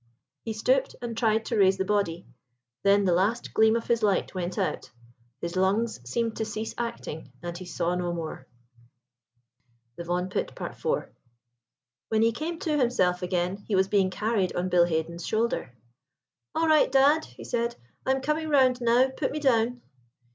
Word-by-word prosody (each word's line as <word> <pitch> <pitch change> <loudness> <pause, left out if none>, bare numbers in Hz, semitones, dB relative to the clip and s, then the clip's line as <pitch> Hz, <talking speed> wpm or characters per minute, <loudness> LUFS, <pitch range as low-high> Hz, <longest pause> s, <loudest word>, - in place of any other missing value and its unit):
He 225 - -4
stooped 255 +5 +1
and 235 -1 -5
tried 225 -1 +1
to 235 - -2
raise 190 -1 +5
the 190 - -1
body. 190 -4 0 0.6
Then 200 0 +4
the 180 - +3
last 205 +7 0
gleam 220 0 +4
of 230 - -2
his 235 -1 +1
light 200 -3 +1
went 180 -1 -3
out—his 120 +7 -6
lungs 200 - +1
seemed 230 - -1
to 220 - -1
cease 220 +1 -4
acting, 230 - -5
and 175 0 -4
he 185 +1 -7
saw 175 0 -1
no 180 -1 -1
more. 160 -6 -6 1.5
THE 170 - -5
VAUGHAN 180 +2 -1
PIT.—IV. 190 - -5 1.2
When 220 0 +2
he 230 - +4
came 315 +8 -4
to 305 -2 0
himself 185 -8 +2
again 180 +1 -1
he 210 - 0
was 190 0 +3
being 195 -2 +3
carried 210 -2 -1
on 180 +1 -1
Bill 175 -1 +5
Haden's 170 0 -2
shoulder. 220 - -1 0.8
"All 325 0 +2
right, 310 -3 +4
dad!" 280 +4 +4
he - - -13
said. 235 0 -1 0.3
"I - - -4
am 265 0 +2
coming 305 +3 -1
round 260 -3 +4
now; 240 +2 +4
put 265 +1 -2
me 300 - -3
down." 245 -3 +1
215 Hz, 170 wpm, -27 LUFS, 180-240 Hz, 1.5 s, raise